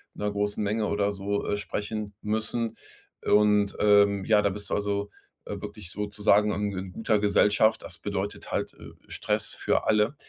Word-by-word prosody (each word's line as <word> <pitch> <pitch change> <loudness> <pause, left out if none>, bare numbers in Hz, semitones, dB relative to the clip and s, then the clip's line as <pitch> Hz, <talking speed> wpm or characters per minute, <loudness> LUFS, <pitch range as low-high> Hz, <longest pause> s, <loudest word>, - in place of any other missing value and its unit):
'ner 105 - -2
großen 105 +1 -1
Menge 105 +1 0
oder 100 0 0
so, 100 +1 -2
äh, - - +1
sprechen 105 0 -4
müssen. 110 +2 -2 0.5
Und, 105 -1 +3
ähm, 100 -2 +4
ja, 105 -2 +4
da 100 - +2
bist 100 +1 -6
du - - -2
also, 100 0 -1 0.4
äh, - - -6
wirklich 105 -3 -8
sozusagen 105 0 +2
in 100 -2 -2
in 95 0 -5
guter 110 +1 +1
Gesellschaft. 105 +2 +3
Das 85 - -8
bedeutet 100 0 -4
halt, - - -2
äh, - - -12 0.2
Stress - - -2
für - - 0
alle. 105 +6 +3
105 Hz, 170 wpm, -27 LUFS, 100-105 Hz, 0.5 s, ähm